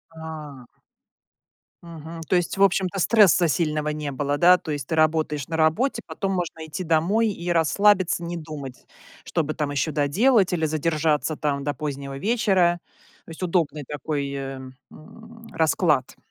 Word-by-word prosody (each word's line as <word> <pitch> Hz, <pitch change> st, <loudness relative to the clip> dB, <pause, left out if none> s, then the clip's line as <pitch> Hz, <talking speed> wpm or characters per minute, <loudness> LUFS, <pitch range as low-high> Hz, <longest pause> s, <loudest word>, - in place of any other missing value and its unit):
А. 155 Hz, -5 st, -9 dB, 1.2 s
Мгм, 165 Hz, 0 st, -9 dB
то -, -, +2 dB
есть, 175 Hz, +2 st, 0 dB
в 195 Hz, -, +4 dB
общем-то, 195 Hz, 0 st, +1 dB
стресса 185 Hz, -4 st, +5 dB
сильного 150 Hz, -1 st, 0 dB
не 150 Hz, -1 st, -4 dB
было, 145 Hz, +2 st, -1 dB
да? 180 Hz, +3 st, +6 dB
То 160 Hz, -, -7 dB
есть 145 Hz, -3 st, -4 dB
ты 165 Hz, -, -1 dB
работаешь 155 Hz, -3 st, +1 dB
на 160 Hz, -, -3 dB
работе, 215 Hz, -, +1 dB
потом 195 Hz, -1 st, -3 dB
можно 170 Hz, -3 st, -4 dB
идти 160 Hz, +4 st, -5 dB
домой 175 Hz, +8 st, +2 dB
и 175 Hz, -3 st, -4 dB
расслабиться, 180 Hz, +2 st, +3 dB
не 170 Hz, +1 st, -4 dB
думать, 150 Hz, -5 st, -8 dB, 0.4 s
что 165 Hz, -, -1 dB
бы 155 Hz, +1 st, -3 dB
там 150 Hz, -2 st, -2 dB
ещё 145 Hz, +2 st, -1 dB
доделать 185 Hz, -, +2 dB
или 160 Hz, -2 st, 0 dB
задержаться 155 Hz, 0 st, 0 dB
там 145 Hz, -2 st, -2 dB
до 145 Hz, +1 st, -1 dB
позднего 140 Hz, -1 st, -5 dB
вечера. 190 Hz, -, +2 dB, 0.5 s
То -, -, -16 dB
есть 165 Hz, -, -8 dB
удобный 165 Hz, -5 st, 0 dB
такой, 145 Hz, -1 st, -3 dB
эм, 135 Hz, -1 st, -6 dB, 0.8 s
расклад. 155 Hz, -4 st, +1 dB
160 Hz, 155 wpm, -24 LUFS, 150-175 Hz, 1.2 s, да